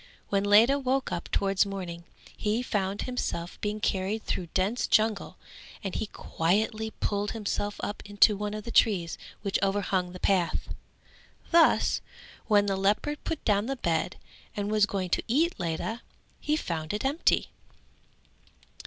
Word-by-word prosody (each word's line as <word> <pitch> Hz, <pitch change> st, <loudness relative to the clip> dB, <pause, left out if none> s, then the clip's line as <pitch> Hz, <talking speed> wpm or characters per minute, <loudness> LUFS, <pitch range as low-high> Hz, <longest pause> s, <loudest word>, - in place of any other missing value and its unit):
When 200 Hz, -1 st, +1 dB
Ledha 220 Hz, +7 st, +6 dB
woke 265 Hz, 0 st, 0 dB
up 170 Hz, -, -4 dB
towards 195 Hz, -1 st, +2 dB
morning, 180 Hz, -4 st, -6 dB, 0.3 s
he 220 Hz, +3 st, 0 dB
found 200 Hz, -3 st, -1 dB
himself 180 Hz, -9 st, -4 dB
being 210 Hz, 0 st, -2 dB
carried 200 Hz, +2 st, -1 dB
through 175 Hz, -, -2 dB
dense 200 Hz, +6 st, +1 dB
jungle 215 Hz, -2 st, +1 dB, 0.5 s
and 195 Hz, -2 st, -3 dB
he 220 Hz, -, -2 dB
quietly 215 Hz, +6 st, -1 dB
pulled 205 Hz, 0 st, -1 dB
himself 205 Hz, -1 st, -2 dB
up 205 Hz, -, -4 dB
into 205 Hz, +1 st, +4 dB
one 210 Hz, +1 st, -3 dB
of 215 Hz, -, -5 dB
the 235 Hz, -, -6 dB
trees 190 Hz, -8 st, +2 dB, 0.2 s
which 200 Hz, -2 st, 0 dB
overhung 195 Hz, -2 st, 0 dB
the 180 Hz, -, -9 dB
path. 180 Hz, -4 st, +1 dB, 0.8 s
Thus 335 Hz, -1 st, +4 dB, 0.5 s
when 205 Hz, -2 st, +4 dB
the 195 Hz, -1 st, 0 dB
leopard 210 Hz, +10 st, 0 dB
put 325 Hz, -, -4 dB
down 205 Hz, +1 st, +2 dB
the 270 Hz, -, -1 dB
bed 170 Hz, -7 st, -1 dB, 0.4 s
and 205 Hz, 0 st, -1 dB
was 210 Hz, -1 st, +4 dB
going 185 Hz, -4 st, -3 dB
to -, -, +1 dB
eat 315 Hz, +9 st, +2 dB
Ledha, 175 Hz, +7 st, -2 dB, 0.4 s
he 300 Hz, -, 0 dB
found 160 Hz, -, -3 dB
it 210 Hz, -, -3 dB
empty. 285 Hz, +5 st, +2 dB
205 Hz, 150 wpm, -28 LUFS, 190-220 Hz, 0.8 s, Ledha